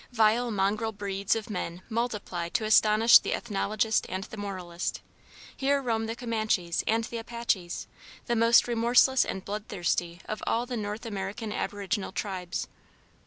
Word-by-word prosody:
Vile 235 +1 +3
mongrel 210 +2 0
breeds 200 -1 -1
of 225 0 -4
men 180 -2 -4
multiply 210 -7 -2
to 225 +3 -1
astonish 215 +1 +7
the - - -2
ethnologist 215 0 0
and 190 +1 -3
the 220 - -9
moralist. 185 -4 -4 0.6
Here 280 +1 +2
roam 225 -4 -1
the 225 - -3
Comanches 215 -8 -1
and 225 +1 +2
the 230 +1 -5
Apaches, 225 -6 -2 0.4
the 240 - 0
most 230 +1 +5
remorseless 240 +2 +4
and 190 - -5
bloodthirsty 180 -4 -2
of 215 - -5
all 235 +2 +1
the 245 0 -4
North 210 0 -4
American 210 +1 -4
aboriginal 205 0 -2
tribes. 185 -1 -4
215 Hz, 145 wpm, -28 LUFS, 195-230 Hz, 0.6 s, astonish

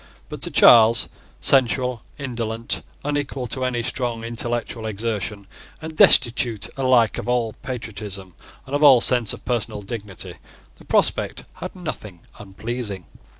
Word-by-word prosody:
But - - -8
to - - +3
Charles, 115 -1 +6 0.3
sensual, 125 -2 +2 0.2
indolent, 115 -4 -3 0.2
unequal 145 -3 -2
to 130 +2 -3
any 125 -2 -1
strong 120 -2 -3
intellectual 115 -1 -3
exertion, 105 -2 -3 0.3
and 160 0 -8
destitute 120 -6 +4
alike 130 -4 +3
of - - -5
all 120 -3 0
patriotism 105 -6 -6 0.3
and 135 - -10
of 145 - +1
all 140 -4 +8
sense 120 -2 +3
of - - -7
personal 105 -4 -2
dignity, 100 -3 -7 0.4
the - - -17
prospect - - 0
had - - -7
nothing 110 - -7 0.2
unpleasing. 105 -1 -5
115 Hz, 130 wpm, -22 LUFS, 110-125 Hz, 0.4 s, all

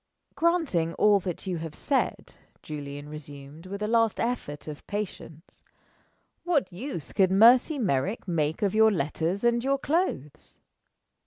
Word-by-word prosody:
"Granting 315 - +1
all 210 -1 +4
that 180 -1 -5
you 180 -3 -2
have 160 -1 -7
said," 280 -2 -1 0.3
Julian 145 -1 -7
resumed, 150 +2 -10
with 200 +2 -5
a - - 0
last 225 -1 +2
effort 225 -13 -3
of 150 -1 -8
patience, 195 -5 -7 0.8
"what 325 - 0
use 175 - -6
could 190 -2 +3
Mercy 240 - +6
Merrick 195 - -1
make 160 0 -1
of 200 - +1
your 220 0 +5
letters 170 +3 -2
and 235 0 +2
your 275 +1 +1
clothes?" 270 - -2
190 Hz, 140 wpm, -27 LUFS, 155-235 Hz, 0.8 s, Mercy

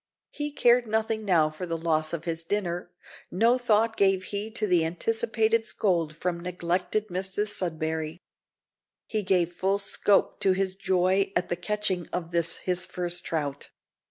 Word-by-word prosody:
He 295 0 -3
cared 240 -3 +3
nothing 220 0 -1
now 165 -5 +3
for 165 +4 -6
the 165 -1 -2
loss 155 -1 0
of 170 -2 -4
his 165 -1 -2
dinner; 175 -2 -2 0.4
no 230 +7 +3
thought 225 -1 +2
gave 195 -2 +3
he 205 +3 -4
to 220 -1 -1
the 180 -4 +3
anticipated 225 - +1
scold 170 -8 0
from 175 0 -2
neglected 180 +4 -1
Mrs 190 +3 -1
Sudberry. 160 -4 -2 0.9
He 215 - -1
gave 180 -3 +1
full 195 +3 +1
scope 200 0 +1
to 190 - +3
his 190 0 0
joy 190 0 +1
at 180 - 0
the - - 0
catching 185 -1 -1
of 175 -1 -5
this, 170 -1 +2
his 180 0 0
first 175 0 -2
trout. 145 -3 -3
185 Hz, 155 wpm, -27 LUFS, 170-210 Hz, 0.9 s, cared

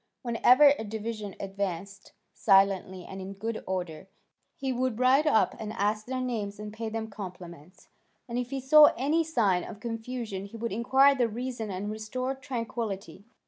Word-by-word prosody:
Whenever 250 +4 +6
a - - -3
division 215 -1 -5
advanced 195 0 -5 0.2
silently 195 -2 +3
and 190 0 -8
in 190 +1 -6
good 220 +3 -4
order, 180 -2 -4 0.5
he 265 -1 -2
would 250 -2 -1
ride 260 +5 +4
up 220 -8 +3
and 215 -1 -5
ask 215 0 -1
their 260 0 -2
names 220 -5 -3
and 210 0 -7
pay 225 0 -4
them 220 0 -4
compliments; 180 -5 -10 0.4
and 240 0 -2
if 245 -1 -3
he 275 0 -3
saw 295 +4 +8
any 300 +6 +2
sign 215 - +1
of 205 - -9
confusion 225 -3 -5
he 200 +3 -10
would 230 +1 -3
inquire 265 +6 +4
the 245 -4 +1
reason 235 -1 -4
and 200 +2 -4
restore 235 +5 -3
tranquillity. 230 -6 -5
220 Hz, 165 wpm, -28 LUFS, 200-250 Hz, 0.5 s, saw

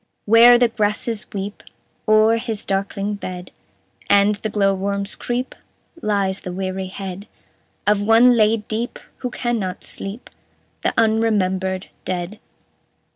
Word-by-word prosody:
"Where 230 +3 +8
the 245 0 +4
grasses 215 0 -1
weep 200 +1 -5 0.5
O'er 215 +1 +5
his 225 -3 -5
darkling 195 +1 -2
bed, 180 -3 -7 0.6
And 200 +1 +5
the 215 +1 -4
glow 200 -1 +2
worms 200 +1 -2
creep, 245 +2 -3 0.5
Lies 200 -2 0
the 180 - -6
weary 190 +1 -3
head 190 +1 -7 0.6
Of 205 0 +3
one 230 +4 +6
laid 215 -1 +2
deep, 225 +3 -3 0.2
who 250 - -4
cannot 230 -7 -3
sleep: 200 +5 -6 0.5
The - - -1
unremembered 195 -4 +1
dead." 185 +3 -4
205 Hz, 125 wpm, -21 LUFS, 195-225 Hz, 0.6 s, Where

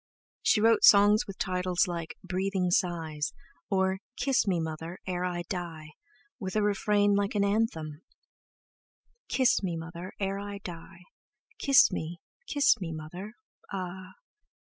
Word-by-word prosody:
She 215 - +3
wrote 225 0 +4
songs 205 +2 +7
with 195 -1 -8
titles 180 -2 0
like 170 -2 -5
"Breathing 185 0 -1
Sighs," 165 -5 -1 0.4
or 190 -1 +1 0.2
"Kiss 265 -5 +1
me, 180 -3 +2
Mother, 160 +2 -5
ere 180 -1 -2
I 175 -1 -2
die," 165 -4 -6 0.5
with 190 -3 -5
a 215 - +2
refrain 205 0 +2
like 200 +1 0
an 200 - +3
anthem: 170 -8 -1 1.3
"Kiss 260 -2 +3
me, 175 -4 -2
Mother, 170 +3 -7
ere 195 0 -1
I 205 0 -6
die; 170 0 -9 0.6
Kiss 275 -5 +6
me 170 -1 -4 0.3
kiss 285 - +3
me, 170 -3 -3
Mother, 175 +7 -7 0.4
ah! 185 -1 -6
185 Hz, 135 wpm, -29 LUFS, 170-205 Hz, 1.3 s, songs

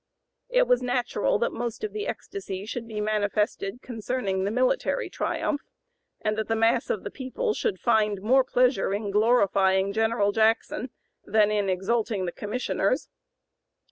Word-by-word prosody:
It - - +3
was 250 - +3
natural 245 -4 0
that 235 - 0
most 235 - -4
of 430 - -3
the 425 +2 -3
ecstasy 200 - -5
should 230 +1 -5
be 215 -2 -5
manifested 210 +1 -1
concerning 220 -5 -2
the - - 0
military 255 - 0
triumph, 290 - -1 0.6
and 215 0 0
that 220 - -2
the 225 - +1
mass 225 +1 +2
of 205 - -1
the - - -5
people 360 - -2
should 445 -3 -2
find 215 -4 +2
more 255 +7 +4
pleasure 250 -6 +2
in 205 -1 -3
glorifying 200 -3 +3
General 220 -2 +2
Jackson 225 +4 +1 0.3
than 210 0 +3
in 205 -2 +1
exalting 200 +1 0
the 175 - -2
Commissioners. 210 - -1
220 Hz, 150 wpm, -26 LUFS, 205-250 Hz, 0.6 s, more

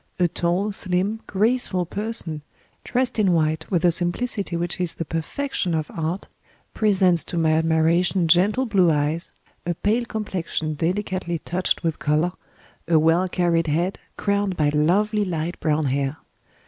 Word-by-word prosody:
A 180 - +3
tall 175 +5 -1
slim 195 +3 -1
graceful 210 -3 +1
person, 200 -5 -3 0.4
dressed 250 -2 0
in 195 -4 +3
white 160 -1 0
with 175 -2 +1
a 175 - +6
simplicity 180 +2 0
which 175 +2 -2
is 175 -2 -1
the 165 - -4
perfection 170 - -2
of 155 -1 -3
art, 165 +4 -3 0.5
presents 190 -6 +3
to 175 - -5
my 160 -1 +3
admiration 165 +3 +2
gentle 200 +10 +3
blue 195 -7 +3
eyes, 150 +2 0 0.3
a 175 0 -2
pale 225 +7 0
complexion 185 -8 -3
delicately 180 +2 -2
touched 180 +4 -1
with 165 -2 -1
color, 150 +5 +1 0.6
a 165 -1 +4
well 165 +4 +3
carried 170 -2 +1
head 170 +6 0 0.2
crowned 200 -2 0
by 150 -2 +3
lovely 200 +8 +2
light 170 -2 -3
brown 155 -1 +1
hair. 140 +2 -1
175 Hz, 145 wpm, -23 LUFS, 160-200 Hz, 0.6 s, a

